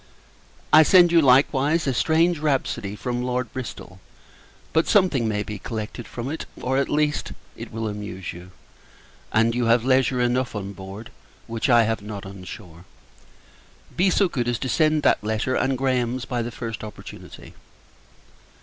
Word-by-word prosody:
I 155 - +10
send 175 +2 +6
you, 170 -1 +6
likewise, 140 +3 +3
a 135 - 0
strange 165 +5 +2
rhapsody 135 -9 -1
from 120 +2 -3
Lord 125 -1 -2
Bristol: 115 -6 -7 0.7
but 160 - +2
something 180 - +3
may 105 -1 -1
be 105 -1 -7
collected 110 +2 -6
from 120 +1 -6
it; 160 - -5
or, 130 +1 -1
at 140 - 0
least, 150 0 0 0.2
it - - -9
will 110 0 -3
amuse 105 -3 -6
you, 90 +1 -11 0.8
and 115 +1 +3
you 120 0 0
have 115 +1 +3
leisure 130 -1 +2
enough 120 0 0
on 100 -1 -5
board, 95 +3 -9 0.3
which 115 +4 -2
I 120 -1 +6
have 110 -1 -1
not 100 -1 -7
on 95 -1 -10
shore. 85 -2 -11 1.1
Be 185 +2 +3
so 195 +1 +3
good 125 -8 -2
as 120 -1 0
to 130 - -4
send 155 +2 +2
back - - +3
that 105 - -7
letter, 110 +4 -1
and 130 0 0
Graham's, 125 -1 -1
by 125 -2 -2
the 120 - -3
first 115 -1 -6
opportunity. 105 - -11
120 Hz, 165 wpm, -23 LUFS, 110-135 Hz, 1.1 s, I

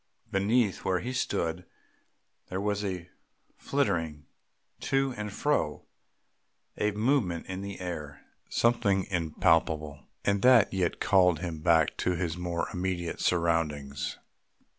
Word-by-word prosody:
Beneath 105 +1 +1
where 95 -1 +1
he 125 +8 -4
stood 85 -8 -1 0.9
there 95 - -3
was 105 0 -1
a 90 -3 -4 0.5
flitting 80 -3 -1 0.5
to 135 -1 0
and 105 0 -4
fro, 105 - 0 0.9
a 105 - +1
movement 105 - 0
in 95 0 -5
the 100 0 -6
air, 75 -6 -6 0.2
something 100 -5 +2
impalpable 80 -3 +1 0.2
and 100 -1 +2
that 125 -4 +6
yet 90 -3 0
called 90 -4 +4
him 85 -4 -4
back 80 -1 +3
to 90 - 0
his 85 -2 -2
more 90 -1 -2
immediate 90 -2 -2
surroundings. 80 -5 0
90 Hz, 120 wpm, -29 LUFS, 80-100 Hz, 0.9 s, that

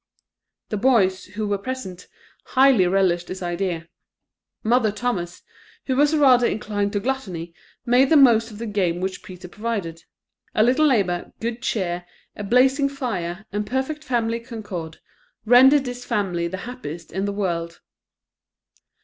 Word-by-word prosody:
The 210 - -2
boys, 200 -5 +2
who 210 +2 -5
were 200 -1 -1
present, 200 -6 -6 0.4
highly 260 -8 +4
relished 180 -2 +1
this 185 0 -6
idea. 175 -1 -3 0.8
Mother 225 -1 +2
Thomas, 205 -6 -3 0.4
who 260 - 0
was 295 +3 +3
rather 255 -5 +5
inclined 205 -1 -2
to 205 - +1
gluttony, 195 -9 -4 0.3
made 250 +3 +4
the 320 - +6
most 235 -4 +5
of 210 - -11
the 230 - -5
game 190 -5 -1
which 185 0 -3
Peter 180 -1 -11
provided. 195 -5 -4 0.5
A 215 - +4
little 260 +6 +4
labour, 190 -9 0
good 230 +1 -4
cheer, 175 -7 -2 0.3
a 210 - -6
blazing 265 +6 +3
fire, 215 -9 -4
and 205 +1 -3
perfect 265 +5 -2
family 230 -4 -1
concord, 205 -9 -7 0.5
rendered 265 +4 +6
this 245 0 -6
family 175 -7 -1
the 190 +2 -5
happiest 175 -10 -8
in 195 +1 -2
the 200 - -1
world. 170 -4 -3
210 Hz, 145 wpm, -22 LUFS, 185-250 Hz, 0.8 s, the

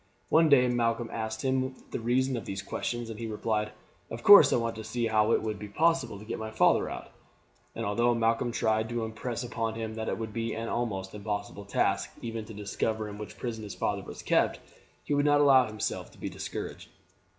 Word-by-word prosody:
One 160 0 +5
day 130 -3 +6
Malcolm 120 -1 0
asked 110 -1 -3
him 130 0 0 0.2
the - - -2
reason 130 +3 +1
of 115 - -5
these 95 0 -4
questions, 120 -1 -3
and 110 - -8
he 115 - -4
replied, 105 0 -1 0.4
"Of 115 +1 -7
course 205 0 +10
I - - +4
want 115 -1 -1
to 110 - -6
see 115 +2 -2
how 110 0 +3
it - - +2
will 110 -1 -1
be 105 0 -8
possible 155 0 +1
to 105 - -11
get - - -4
my 110 0 -4
father 110 - +3
out." - - -7 0.6
And 115 - -3
although 120 +4 +2
Malcolm 115 +1 +1
tried 110 -1 +1
to 120 -1 -2
impress 115 +2 -4
upon 115 -2 -2
him 110 -1 -4
that 110 0 -3
it - - -2
would 110 -2 -5
be 115 0 -2
an 115 0 -4
almost 95 -6 -2
impossible 100 -1 -4
task 100 -10 +1
even 115 -2 -5
to 110 - -10
discover 105 +1 -2
in 105 0 -8
which 105 - -8
prison 115 -3 -4
his 105 - -7
father - - -1
was - - -9
kept, - - +2 0.4
he - - -2
would 145 0 +3
not 145 0 +5
allow 135 -4 +6
himself 110 -1 -3
to - - -18
be - - -4
discouraged. - - -6
115 Hz, 215 wpm, -29 LUFS, 110-120 Hz, 0.6 s, course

